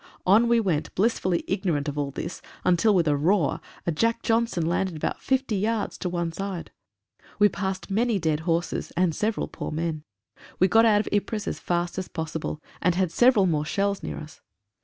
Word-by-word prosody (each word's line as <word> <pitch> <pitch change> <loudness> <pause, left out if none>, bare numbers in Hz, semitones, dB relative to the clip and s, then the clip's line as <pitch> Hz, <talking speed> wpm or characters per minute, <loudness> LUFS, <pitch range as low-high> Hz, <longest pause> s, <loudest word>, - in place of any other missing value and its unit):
On 215 +6 +5
we 235 0 +4
went 175 -8 -1
blissfully 185 -4 +1
ignorant 175 -7 -1
of 145 - -3
all 145 -1 -1
this 140 - -6 0.2
until 185 +4 +4
with 170 -3 +3
a 145 - +3
roar, 165 +2 +1 0.2
a 170 - +1
"Jack 230 +8 0
Johnson," 225 -7 +1
landed 175 +1 0
about 155 - -3
fifty 260 -4 0
yards 215 +2 -1
to 180 - -2
one 170 -1 -2
side. 190 0 -5 0.7
We 210 0 +5
passed 190 -1 -4
many 225 +2 +2
dead 160 -4 0
horses, 165 +1 -1
and 180 -2 +3
several 215 +6 -1
poor - - -6
men. 160 -1 -3 0.5
We 185 - +4
got 225 +4 +5
out 210 -2 +5
of - - -6
Ypres 205 +1 -1
as - - -3
fast 175 +1 -1
as 185 - -5
posible, 160 -2 -4 0.2
and 180 0 +2
had 185 -2 +1
several 240 -3 +5
more 155 -4 +1
shells 200 +5 -1
near - - -5
us. 155 +1 -10
185 Hz, 190 wpm, -25 LUFS, 165-210 Hz, 0.7 s, On